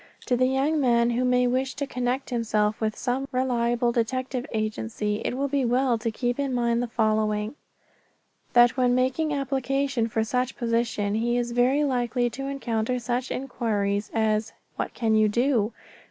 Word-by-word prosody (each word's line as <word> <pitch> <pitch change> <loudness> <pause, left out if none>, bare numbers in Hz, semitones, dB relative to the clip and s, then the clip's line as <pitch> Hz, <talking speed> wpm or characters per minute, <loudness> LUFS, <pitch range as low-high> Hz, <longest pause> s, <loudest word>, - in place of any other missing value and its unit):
To 250 - +1
the 255 +1 +3
young 275 +4 +1
man 235 -2 +3
who 240 +2 0
may 250 0 +3
wish 260 +2 0
to 280 - -2
connect 250 +1 -2
himself 215 -3 0
with 215 -1 0
some 265 +2 -2
reliable 240 -2 +1
detective 255 +2 -2
agency 215 -1 -2
it 250 - -2
will 280 +1 0
be 280 -1 0
well 245 0 +2
to 230 +1 -1
keep 245 +3 -2
in 275 -2 -1
mind 235 -1 +1
the 245 - -2
following: 215 -1 0 1.0
That 240 -1 +6
when 250 -2 +2
making 260 +5 +1
application 275 -3 0
for 225 0 0
such 250 +3 -1
position 230 -3 0
he 240 +2 +1
very 245 +4 +2
likely 245 -3 0
will 270 +1 -4
encounter 250 -3 -1
such 245 +1 -2
inquiries 210 -6 -1
as: 220 -1 0 0.2
"What - - -4
can 225 -2 +1
you 215 -1 +4
do?" 235 -1 +1
245 Hz, 165 wpm, -25 LUFS, 225-260 Hz, 1.0 s, That